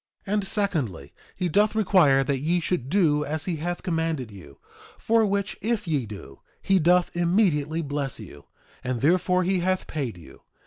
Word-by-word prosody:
2:24 200 - -3
And 205 -2 0
secondly, 135 - -2 0.2
he 180 - -1
doth 205 +6 +2
require 180 -10 +4
that 135 -1 -1
ye 165 +6 +1
should 165 -6 -2
do 155 -5 +2
as 155 +1 -3
he 175 -3 -2
hath 175 +3 -4
commanded 160 - -2
you; 85 -9 -13 0.4
for 225 -1 +2
which 200 0 -2
if 215 -2 -1
ye 145 -8 -1
do, 95 -10 -10 0.2
he 195 -1 +2
doth 175 +2 +3
immediately 170 -3 +1
bless 140 -3 -3
you; 80 -9 -12 0.4
and 125 -2 -3
therefore 180 +4 +2
he 185 +1 +1
hath 185 +1 0
paid 135 - -4
you. 85 - -15
165 Hz, 175 wpm, -25 LUFS, 135-185 Hz, 0.4 s, require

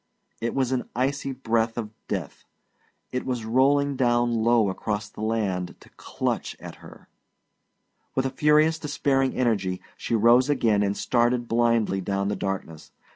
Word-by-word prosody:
It 115 0 -2
was 130 -2 +1
an 130 -1 -2
icy 135 +2 -1
breath 115 -3 -1
of 110 -3 -4 0.2
death; - - -4 0.7
it 125 - -2
was 125 -4 -3
rolling 140 +4 +2
down 120 -2 +2
low 115 -1 +3
across 105 +2 -3
the 105 - -11
land 100 -5 -1
to - - -18
clutch - - -3
at - - -10
her. - - -15 1.1
With 130 - +1
a 135 - -1
furious, 150 +3 +3
despairing 140 -3 0
energy 100 -7 0 0.2
she 115 - -2
rose 120 +5 +5
again 115 -7 +2
and 100 0 0
started 120 0 +1
blindly 115 -4 +1
down 100 +1 -1
the - - -1
darkness. 95 -5 -5
120 Hz, 150 wpm, -25 LUFS, 105-130 Hz, 1.1 s, rose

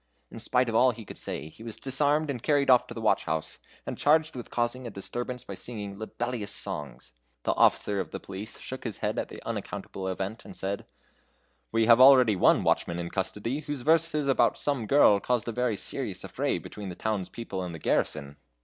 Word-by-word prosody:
In - - -8
spite 125 0 +2
of 115 - -2
all 130 +3 +5
he 115 -2 -5
could - - -10
say, 70 - -5
he 95 - -17
was 115 -1 -6
disarmed 145 +3 +1
and 125 -4 -5
carried 140 -1 +3
off 125 - +5
to 120 - -8
the 115 - -5
watch 110 - +2
house, 80 -1 -2 0.3
and - - -5
charged 155 +1 +3
with 120 - -7
causing 120 +1 -1
a - - -4
disturbance 120 +5 -5
by - - -7
singing 100 -1 -5
libellous 115 -1 -3
songs. 70 -9 -5 0.3
The - - +2
officer 100 -1 +3
of 95 - -3
the - - -6
police 100 +3 -7
shook 130 - -7
his 110 -5 -4
head - - 0
at - - -2
the - - -10
unaccountable 95 -1 -5
event, 95 +4 -4
and - - -11
said: 100 +1 -4 0.8
"We 115 0 +3
have 115 +2 +7
already 130 -5 +8
one 90 - +4
watchman 85 - +1
in 85 0 -4
custody, 105 +7 -2
whose 145 -3 -5
verses 160 0 +2
about 135 - +3
some 135 -7 -1
girl 120 -7 +6
caused 120 +2 -1
a - - -1
very 120 -2 0
serious - - -3
affray - - -1
between 105 -2 -8
the 90 - -6
town's 105 -3 -2
people 110 -5 -5
and 90 -2 -5
the - - -6
garrison." 75 -2 -1
115 Hz, 210 wpm, -28 LUFS, 100-130 Hz, 0.8 s, already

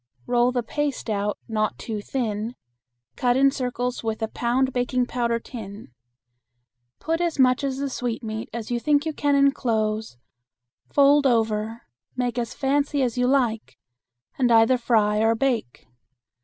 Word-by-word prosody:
Roll 245 0 +2
the 245 -1 -1
paste 285 -2 -3
out 205 0 -1
not 215 -2 -1
too 215 -3 -5
thin, 225 -1 -3 0.6
cut 245 0 +2
in 275 0 +5
circles 250 -2 -3
with 225 0 -2
a - - +1
pound 245 +3 0
baking 250 0 0
powder 235 -1 -1
tin. 210 - -9 1.1
Put 325 +2 -2
as 340 -3 -1
much 255 0 +3
of 270 -1 -1
the 280 +1 -2
sweetmeat 225 -4 -4
as 235 0 -6
you 240 - 0
think 290 +3 +2
you 315 - -2
can 290 -1 +1
enclose, 220 - +1 0.7
fold 285 0 +5
over, 225 -1 0 0.3
make 245 -1 -1
as 235 -1 -4
fancy 280 +1 +1
as 240 -3 -1
you 250 0 +1
like, 245 -5 0 0.6
and 250 -2 +3
either 230 +2 +5
fry 215 -3 +2
or 225 +1 +3
bake. 230 - -2
245 Hz, 150 wpm, -24 LUFS, 225-270 Hz, 1.1 s, in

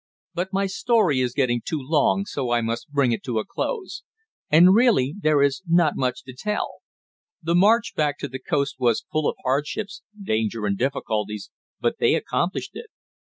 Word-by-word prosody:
But 180 +2 -3
my 195 0 +1
story 195 - +2
is 125 -1 -2
getting 120 -4 +1
too 160 - -3
long, 150 +7 +1
so 135 -9 -3
I 120 0 +2
must 115 +3 -3
bring 140 -4 +2
it 115 - -1
to 120 -3 -2
a 110 - -1
close. 440 -6 -4 0.5
And 175 +5 +7
really 210 - +3
there 150 -4 +3
is 140 +4 +1
not 170 -2 +3
much 130 -1 -2
to 130 - -10
tell. 210 +10 -3 0.7
The 165 +1 0
march 210 +6 +4
back 145 -2 0
to 140 - -2
the 130 -1 -7
coast 140 -1 -1
was 120 -3 +1
full 155 -1 +1
of - - -4
hardships, 150 +10 -2 0.2
danger 110 - -1
and 100 -1 0
difficulties, 105 -4 -3 0.3
but - - -1
they - - +3
accomplished - - -2
it. - - -9
140 Hz, 180 wpm, -23 LUFS, 125-180 Hz, 0.7 s, And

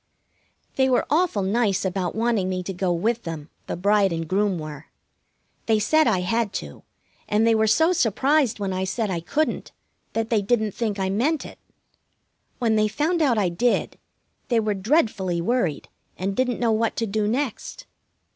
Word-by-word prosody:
They 265 0 +3
were 250 - +2
awful 315 - +2
nice 200 -1 +1
about 185 -1 -2
wanting 220 -4 +1
me 185 -1 -2
to 195 - -5
go 180 0 -1
with 220 +7 0
them. 160 -4 -7 0.2
The - - -3
bride 200 +1 +3
and 165 -1 -3
groom 195 +1 +1
were. 155 -1 -8 0.8
They 220 -1 +4
said 310 +9 +3
I 190 -5 +2
had 215 +3 0
to, 70 -1 -6 0.5
and 210 +2 +2
they 230 - +4
were 220 0 +2
so 320 +11 +4
surprised 270 - +2
when 200 -2 -2
I 185 0 -1
said 210 +2 -2
I 175 - -1
couldn't 295 - -2 0.4
that 225 0 -2
they 220 -3 +3
didn't 215 0 +1
think 215 -1 -2
I 190 -1 -1
meant 275 +10 0
it. - - -11 1.0
When 225 -3 +1
they 215 0 +3
found 310 +10 0
out 260 -7 +3
I 195 -4 +2
did, 230 +8 0 0.5
they 235 -2 +2
were 215 -1 0
dreadfully 200 - +1
worried, 180 - -1 0.3
and 195 +2 -2
didn't 250 0 0
know 235 -2 +2
what 225 +1 0
to 230 - -1
do 210 0 -1
next. 270 - -3
215 Hz, 180 wpm, -24 LUFS, 190-240 Hz, 1.0 s, They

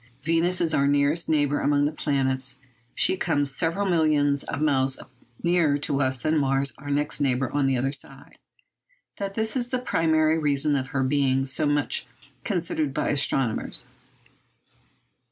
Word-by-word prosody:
Venus 165 +3 +1
is 165 -2 +1
our 140 -1 +2
nearest 145 +4 +1
neighbour 145 -2 +1
among 145 0 +2
the 145 - 0
planets. 135 -3 -1 0.4
She - - +2
comes 145 -6 0
several 165 +8 0
millions 150 -5 +2
of 145 - -5
miles 135 -3 +1 0.4
nearer 170 -4 +2
to 140 -1 -1
us 130 -1 +1
than 155 +4 0
Mars, 135 0 +1
our 145 +1 -8
next 145 +1 -1
neighbour 130 -2 0
on 145 -2 +1
the 135 -1 +1
other 135 +2 -1
side. 140 - -10 0.8
That 195 0 -5
is 225 +3 -1
the 255 - -1
primary 160 -8 +1
reason 145 -1 +2
of 130 -1 -2
her 135 0 -1
being 135 -1 +1
so 140 +3 +2
much 145 -3 -1 0.4
considered 165 - -2
by 150 - -1
astronomers. 135 -4 0
145 Hz, 155 wpm, -25 LUFS, 135-160 Hz, 0.8 s, our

